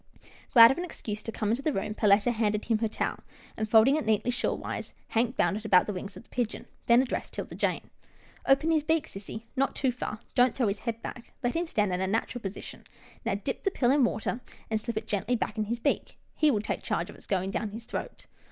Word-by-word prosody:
Glad 230 Hz, -1 st, +10 dB
of 270 Hz, -, -2 dB
an -, -, -2 dB
excuse 215 Hz, -11 st, -5 dB
to 225 Hz, -, -5 dB
come 215 Hz, -1 st, -1 dB
into 240 Hz, +4 st, 0 dB
the 310 Hz, -, +1 dB
room, 210 Hz, -3 st, -2 dB
Perletta 210 Hz, +2 st, +4 dB
handed 215 Hz, -2 st, 0 dB
him 225 Hz, -2 st, +1 dB
her 225 Hz, -, +1 dB
towel, 215 Hz, -, -2 dB, 0.4 s
and, 215 Hz, 0 st, -3 dB
folding 230 Hz, +7 st, +6 dB
it 310 Hz, -, -2 dB
neatly 220 Hz, +3 st, +2 dB
shawl 245 Hz, -, -1 dB
wise. -, -, -5 dB
Hank 235 Hz, +2 st, +1 dB
bound 200 Hz, -, +2 dB
it 215 Hz, -, -7 dB
about 190 Hz, -4 st, +5 dB
the 205 Hz, -, -3 dB
wings 195 Hz, +1 st, -6 dB
of -, -, -11 dB
the -, -, -31 dB
pigeon, 245 Hz, -3 st, -2 dB, 0.2 s
then 240 Hz, +2 st, +6 dB
addressed 260 Hz, -, -4 dB
'Tilda -, -, -5 dB
Jane. -, -, -1 dB, 0.3 s
" -, -, -27 dB
Open 290 Hz, +4 st, +4 dB
his 315 Hz, -1 st, +3 dB
beak, 320 Hz, 0 st, +1 dB
sissy 205 Hz, +3 st, -7 dB
— -, -, -38 dB
not 270 Hz, +1 st, +1 dB
too 265 Hz, -2 st, +1 dB
far. 225 Hz, -3 st, -5 dB
Don't 250 Hz, -1 st, +4 dB
throw 240 Hz, -6 st, +2 dB
his 200 Hz, +1 st, -2 dB
head 230 Hz, 0 st, -5 dB
back. 240 Hz, -, -8 dB
Let 245 Hz, +4 st, 0 dB
him 340 Hz, +1 st, 0 dB
stand 210 Hz, -, +1 dB
in 180 Hz, -, -1 dB
a 190 Hz, -, +1 dB
natural 225 Hz, +4 st, -1 dB
position. 195 Hz, -1 st, -7 dB, 0.4 s
Now -, -, +1 dB
dip -, -, -3 dB
the 390 Hz, -, +1 dB
pill 250 Hz, -9 st, +2 dB
in 280 Hz, -1 st, +4 dB
water, 235 Hz, +1 st, -1 dB, 0.3 s
and 220 Hz, -1 st, +1 dB
slip 230 Hz, 0 st, -4 dB
it 220 Hz, -, -2 dB
gently 215 Hz, +4 st, 0 dB
back 220 Hz, -1 st, -2 dB
in 215 Hz, -, +1 dB
his 235 Hz, +3 st, -2 dB
beak. 275 Hz, +4 st, -1 dB, 0.2 s
He 305 Hz, -, +3 dB
will 215 Hz, -7 st, +2 dB
take -, -, -3 dB
charge -, -, -2 dB
of -, -, -14 dB
its -, -, -15 dB
going 190 Hz, -1 st, 0 dB
down 215 Hz, +1 st, -2 dB
his 225 Hz, +3 st, -8 dB
throat." -, -, -6 dB
225 Hz, 255 wpm, -29 LUFS, 210-250 Hz, 0.4 s, Glad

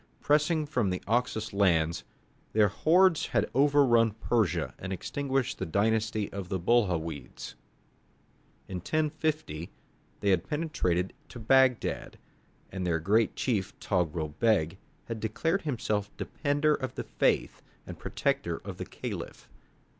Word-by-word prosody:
Pressing 155 Hz, +2 st, +2 dB
on -, -, -3 dB
from 125 Hz, -9 st, 0 dB
the 90 Hz, 0 st, -3 dB
Oxus 110 Hz, -2 st, 0 dB
lands, 85 Hz, -5 st, +2 dB, 0.5 s
their 105 Hz, -1 st, +4 dB
hordes 170 Hz, -, +3 dB
had -, -, 0 dB
overrun 130 Hz, -5 st, +4 dB
Persia 90 Hz, -, 0 dB
and 95 Hz, -, -6 dB
extinguished 135 Hz, +5 st, -2 dB
the 95 Hz, -, -2 dB
dynasty 110 Hz, +3 st, +1 dB
of 95 Hz, -2 st, -5 dB
the 95 Hz, -, 0 dB
Buhawides. 85 Hz, -8 st, -1 dB, 1.1 s
In 95 Hz, -, -4 dB
1050, 155 Hz, -, -2 dB, 0.5 s
they 100 Hz, -, +2 dB
had 90 Hz, -3 st, +1 dB
penetrated 95 Hz, -, -1 dB, 0.2 s
to -, -, -10 dB
Bagdad, 130 Hz, +1 st, +2 dB, 0.5 s
and 95 Hz, 0 st, -4 dB
their 85 Hz, -2 st, +2 dB
great 105 Hz, +7 st, +2 dB
chief, 105 Hz, -7 st, -1 dB
Togrul 85 Hz, -5 st, -1 dB
Beg, 95 Hz, -6 st, +2 dB, 0.3 s
had 115 Hz, -1 st, -5 dB
declared 165 Hz, -, 0 dB
himself 110 Hz, -8 st, -1 dB
"defender 145 Hz, +1 st, +1 dB
of 130 Hz, -3 st, -3 dB
the -, -, -3 dB
faith -, -, 0 dB, 0.2 s
and -, -, -9 dB
protector -, -, -1 dB
of -, -, -6 dB
the -, -, -5 dB
Caliph." -, -, -7 dB
110 Hz, 130 wpm, -29 LUFS, 90-140 Hz, 1.1 s, their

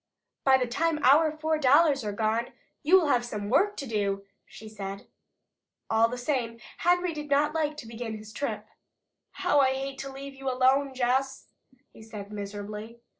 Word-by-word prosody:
"By 265 Hz, -1 st, +6 dB
the 255 Hz, -, 0 dB
time 315 Hz, +6 st, 0 dB
our 300 Hz, +5 st, +6 dB
four 310 Hz, 0 st, -1 dB
dollars 280 Hz, 0 st, +4 dB
are 210 Hz, -, -2 dB
gone, 220 Hz, +3 st, -1 dB, 0.3 s
you 360 Hz, +6 st, +6 dB
will 315 Hz, -5 st, 0 dB
have 245 Hz, -3 st, +3 dB
some 210 Hz, -3 st, -5 dB
work 405 Hz, +10 st, +3 dB
to 280 Hz, -, -4 dB
do," 200 Hz, -4 st, -1 dB, 0.2 s
she 220 Hz, -, -12 dB
said. 200 Hz, -2 st, -7 dB, 0.9 s
All 225 Hz, +1 st, +4 dB
the 250 Hz, -, -5 dB
same 245 Hz, -3 st, -2 dB, 0.2 s
Henry 355 Hz, 0 st, +2 dB
did 300 Hz, -1 st, -6 dB
not 285 Hz, +2 st, +2 dB
like 305 Hz, -2 st, -1 dB
to 235 Hz, -, -8 dB
begin 225 Hz, -1 st, -5 dB
his 215 Hz, 0 st, -12 dB
trip. 285 Hz, -, -3 dB, 0.7 s
"How 360 Hz, -6 st, +2 dB
I 265 Hz, -1 st, +4 dB
hate 270 Hz, 0 st, -5 dB
to 275 Hz, -, -5 dB
leave 275 Hz, +1 st, -8 dB
you 270 Hz, 0 st, -4 dB
alone, 260 Hz, +2 st, +2 dB
Jess!" 260 Hz, +2 st, 0 dB, 0.4 s
he -, -, -14 dB
said 210 Hz, -2 st, -9 dB
miserably. 210 Hz, +2 st, -7 dB
260 Hz, 175 wpm, -28 LUFS, 220-290 Hz, 0.9 s, By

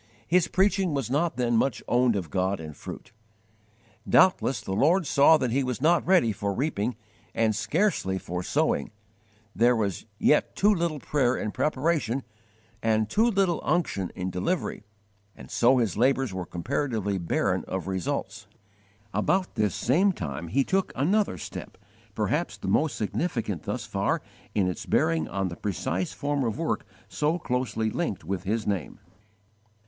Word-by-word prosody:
His 175 Hz, 0 st, +3 dB
preaching 190 Hz, -3 st, +2 dB
was 135 Hz, -3 st, -2 dB
not 150 Hz, -1 st, +1 dB
then 120 Hz, -2 st, +1 dB
much 135 Hz, +4 st, +1 dB
owned 120 Hz, -2 st, +3 dB
of 90 Hz, -6 st, -3 dB
God 95 Hz, +1 st, 0 dB
in 80 Hz, -1 st, -7 dB
fruit. -, -, -9 dB, 1.0 s
Doubtless 180 Hz, -7 st, +4 dB
the -, -, -7 dB
Lord 165 Hz, -, +3 dB
saw 145 Hz, +3 st, +6 dB
that 125 Hz, -5 st, -1 dB
he 135 Hz, +3 st, +1 dB
was 125 Hz, -3 st, -3 dB
not 165 Hz, +5 st, +3 dB
ready 180 Hz, -12 st, +4 dB
for 100 Hz, 0 st, -3 dB
reaping, 125 Hz, -4 st, -1 dB, 0.4 s
and 110 Hz, -2 st, +2 dB
scarcely 110 Hz, -, 0 dB
for 90 Hz, -1 st, -4 dB
sowing: 70 Hz, -4 st, 0 dB, 0.7 s
there 120 Hz, +3 st, +4 dB
was 100 Hz, -6 st, -2 dB
yet -, -, +2 dB
too 210 Hz, +2 st, +4 dB
little 170 Hz, -4 st, -1 dB
prayer 130 Hz, -3 st, +1 dB
in 105 Hz, -, -3 dB
preparation 140 Hz, -, 0 dB, 0.6 s
and 110 Hz, -1 st, +1 dB
too 225 Hz, +3 st, +4 dB
little 195 Hz, -6 st, +1 dB
unction 100 Hz, -, 0 dB
in 90 Hz, 0 st, -3 dB
delivery, 95 Hz, -, -2 dB, 0.5 s
and -, -, -12 dB
so 125 Hz, +2 st, +4 dB
his 115 Hz, -8 st, +1 dB
labours 130 Hz, -1 st, +2 dB
were 90 Hz, -1 st, -4 dB
comparatively 105 Hz, -1 st, -2 dB
barren 85 Hz, -, 0 dB
of 95 Hz, 0 st, -4 dB
results. 95 Hz, -2 st, -3 dB, 0.7 s
About 185 Hz, -, +1 dB
this 105 Hz, -4 st, 0 dB
same 185 Hz, +11 st, +3 dB
time 75 Hz, -, -5 dB
he 135 Hz, +12 st, +2 dB
took 190 Hz, +6 st, 0 dB
another 190 Hz, -, +1 dB
step -, -, -8 dB, 0.4 s
perhaps -, -, -1 dB
the -, -, -7 dB
most 150 Hz, -5 st, +2 dB
significant 110 Hz, -, -2 dB
thus -, -, -3 dB
far -, -, -1 dB, 0.3 s
in 100 Hz, -3 st, +2 dB
its 90 Hz, -, -4 dB
bearing 80 Hz, -1 st, +2 dB
on 95 Hz, +1 st, -2 dB
the 85 Hz, -, -7 dB
precise 95 Hz, -1 st, -2 dB
form 145 Hz, -1 st, -1 dB
of 115 Hz, -1 st, -1 dB
work 165 Hz, 0 st, -2 dB, 0.2 s
so 155 Hz, +3 st, 0 dB
closely 125 Hz, -7 st, -1 dB
linked 105 Hz, -, -2 dB
with 95 Hz, +2 st, -4 dB
his 110 Hz, +3 st, -1 dB
name. 100 Hz, -6 st, -3 dB
120 Hz, 155 wpm, -27 LUFS, 95-155 Hz, 1.0 s, saw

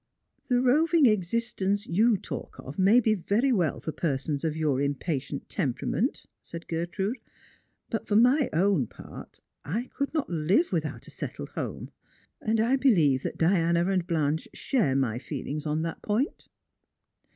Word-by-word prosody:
" -, -, -46 dB
The 250 Hz, 0 st, +3 dB
roving 310 Hz, +4 st, +4 dB
existence 205 Hz, -1 st, 0 dB
you 215 Hz, +5 st, +3 dB
talk -, -, -7 dB
of 140 Hz, +7 st, -9 dB
may 200 Hz, +6 st, +6 dB
be 220 Hz, -2 st, +2 dB
very 215 Hz, +7 st, +1 dB
well 180 Hz, -, +1 dB
for 160 Hz, -, -4 dB
per 150 Hz, -4 st, -1 dB
sons 140 Hz, +2 st, -4 dB
of 160 Hz, -2 st, -1 dB
your 145 Hz, -4 st, +1 dB
impatient 140 Hz, 0 st, -2 dB
temperament," -, -, -1 dB, 0.2 s
said 170 Hz, 0 st, -9 dB
Gertrude; 185 Hz, +8 st, -2 dB, 0.4 s
" -, -, -45 dB
but 225 Hz, -, -3 dB
for. 205 Hz, -, +1 dB
my 250 Hz, +5 st, +5 dB
own 175 Hz, -, +2 dB
part, -, -, -12 dB, 0.2 s
I 220 Hz, -, -3 dB
could 280 Hz, 0 st, -1 dB
not 310 Hz, -3 st, -1 dB
live 180 Hz, -, +1 dB
without -, -, -2 dB
a -, -, -11 dB
settled -, -, -6 dB
home; -, -, -5 dB, 0.5 s
and 220 Hz, 0 st, +1 dB
I 240 Hz, +5 st, +3 dB
believe 165 Hz, -, +3 dB
that -, -, -4 dB
Diana 170 Hz, 0 st, +2 dB
and 185 Hz, -2 st, 0 dB
Blanche 155 Hz, -1 st, 0 dB
share 210 Hz, -, +1 dB
my 125 Hz, -4 st, 0 dB
feelings 150 Hz, +2 st, -5 dB
on 155 Hz, +1 st, 0 dB
that 165 Hz, -1 st, -4 dB
point." 220 Hz, +7 st, -1 dB
185 Hz, 160 wpm, -27 LUFS, 155-230 Hz, 0.5 s, may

